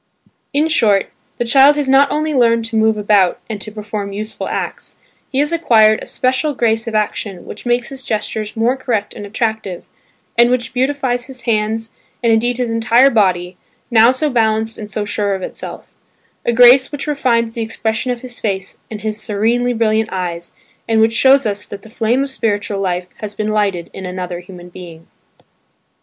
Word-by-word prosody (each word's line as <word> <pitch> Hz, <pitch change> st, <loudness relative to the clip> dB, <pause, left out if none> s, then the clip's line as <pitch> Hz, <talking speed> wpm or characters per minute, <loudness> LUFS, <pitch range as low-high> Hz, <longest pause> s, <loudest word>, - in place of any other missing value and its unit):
In 295 Hz, +3 st, +2 dB
short, 215 Hz, -11 st, +2 dB, 0.3 s
the 240 Hz, -, -1 dB
child 275 Hz, +4 st, +6 dB
has 290 Hz, -2 st, -1 dB
not 270 Hz, +1 st, +5 dB
only 310 Hz, +1 st, -1 dB
learned 230 Hz, -3 st, +3 dB
to 230 Hz, 0 st, -5 dB
move 220 Hz, 0 st, +3 dB
about 205 Hz, -3 st, +2 dB
and 215 Hz, -3 st, -5 dB
to 215 Hz, -, -6 dB
perform 210 Hz, -1 st, -5 dB
useful 215 Hz, +2 st, -5 dB
acts; -, -, -5 dB, 0.3 s
he 265 Hz, -, -3 dB
has 295 Hz, +4 st, +1 dB
acquired 220 Hz, -10 st, +4 dB
a -, -, -7 dB
special 260 Hz, +3 st, 0 dB
grace 225 Hz, -1 st, 0 dB
of 225 Hz, -, -3 dB
action 205 Hz, -3 st, -2 dB
which 215 Hz, -, -9 dB
makes 240 Hz, 0 st, +1 dB
his 270 Hz, -1 st, -6 dB
gestures 215 Hz, -1 st, -3 dB
more 235 Hz, +3 st, +2 dB
correct 235 Hz, -6 st, -2 dB
and 205 Hz, -, -8 dB
attractive, 220 Hz, -4 st, -3 dB, 0.5 s
and 240 Hz, 0 st, +6 dB
which 250 Hz, 0 st, -1 dB
beautifies 255 Hz, -2 st, 0 dB
his 260 Hz, -2 st, -9 dB
hands 220 Hz, 0 st, -1 dB, 0.3 s
and 230 Hz, -1 st, +4 dB
indeed 240 Hz, +2 st, +1 dB
his 245 Hz, -2 st, -1 dB
entire 230 Hz, +4 st, +4 dB
body 185 Hz, -5 st, +1 dB, 0.3 s
now 230 Hz, 0 st, +6 dB
so 260 Hz, +4 st, -1 dB
balanced 220 Hz, -2 st, 0 dB
and 210 Hz, -1 st, -7 dB
so 210 Hz, +1 st, -2 dB
sure 205 Hz, -1 st, -1 dB
of 190 Hz, -, -6 dB
itself; -, -, -7 dB, 0.6 s
a -, -, +4 dB
grace 245 Hz, +2 st, +6 dB
which 290 Hz, -2 st, -5 dB
refines 235 Hz, -6 st, 0 dB
the 230 Hz, -, -4 dB
expression 225 Hz, +2 st, -2 dB
of 245 Hz, -1 st, -2 dB
his 250 Hz, -2 st, -9 dB
face 195 Hz, -3 st, -3 dB
and 215 Hz, -1 st, -7 dB
of -, -, -16 dB
his 215 Hz, 0 st, -3 dB
serenely 230 Hz, +4 st, 0 dB
brilliant 220 Hz, -1 st, +1 dB
eyes, 175 Hz, -2 st, -4 dB, 0.3 s
and 225 Hz, -1 st, +2 dB
which 225 Hz, +1 st, +3 dB
shows 270 Hz, +3 st, +5 dB
us 205 Hz, -1 st, -3 dB
that 200 Hz, -1 st, -9 dB
the 220 Hz, -, -14 dB
flame 240 Hz, +3 st, +1 dB
of 280 Hz, -, -4 dB
spiritual 205 Hz, -4 st, -2 dB
life 180 Hz, -2 st, -1 dB
has 210 Hz, -1 st, -7 dB
been 215 Hz, 0 st, -2 dB
lighted 200 Hz, -5 st, -1 dB
in 190 Hz, -, -7 dB
another 180 Hz, -1 st, -5 dB
human 180 Hz, -1 st, -12 dB
being. 170 Hz, -2 st, -11 dB
225 Hz, 190 wpm, -17 LUFS, 205-245 Hz, 0.6 s, child